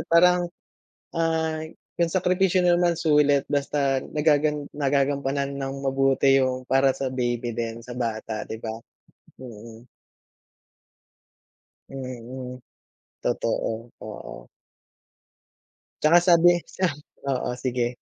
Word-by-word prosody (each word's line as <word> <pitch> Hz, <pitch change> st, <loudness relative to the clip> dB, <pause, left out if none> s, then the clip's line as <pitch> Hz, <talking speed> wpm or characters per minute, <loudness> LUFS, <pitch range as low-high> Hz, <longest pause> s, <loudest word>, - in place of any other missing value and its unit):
parang, 175 Hz, +1 st, +5 dB, 0.7 s
ah, 160 Hz, -1 st, 0 dB, 0.3 s
yung 170 Hz, -1 st, +1 dB
sakripisyo 185 Hz, +1 st, +2 dB
naman 175 Hz, -1 st, +3 dB
sulit 145 Hz, -3 st, +3 dB
basta 140 Hz, -2 st, 0 dB
nagagan 150 Hz, -1 st, +1 dB
nagagampanan 140 Hz, -1 st, 0 dB
nang 135 Hz, 0 st, -4 dB
mabuti 135 Hz, 0 st, +3 dB
yung 130 Hz, -1 st, 0 dB
para 135 Hz, 0 st, +4 dB
sa 135 Hz, -, -3 dB
baby 120 Hz, -2 st, -2 dB
din, 115 Hz, -1 st, -3 dB
sa 125 Hz, +1 st, -9 dB
bata, 110 Hz, -2 st, -3 dB
'di 110 Hz, -, -7 dB
ba? 110 Hz, -1 st, -5 dB, 0.7 s
Mm. 115 Hz, -1 st, -11 dB, 2.1 s
Mm, 125 Hz, -1 st, -7 dB, 0.6 s
totoo, 115 Hz, +1 st, -2 dB
oo. -, -, -9 dB, 1.5 s
Tsaka 160 Hz, +3 st, +7 dB
sabi 175 Hz, -1 st, +5 dB
sa 185 Hz, -, -1 dB, 0.4 s
oo, 130 Hz, -2 st, -1 dB
sige. 125 Hz, -2 st, 0 dB
135 Hz, 95 wpm, -25 LUFS, 125-160 Hz, 2.1 s, Tsaka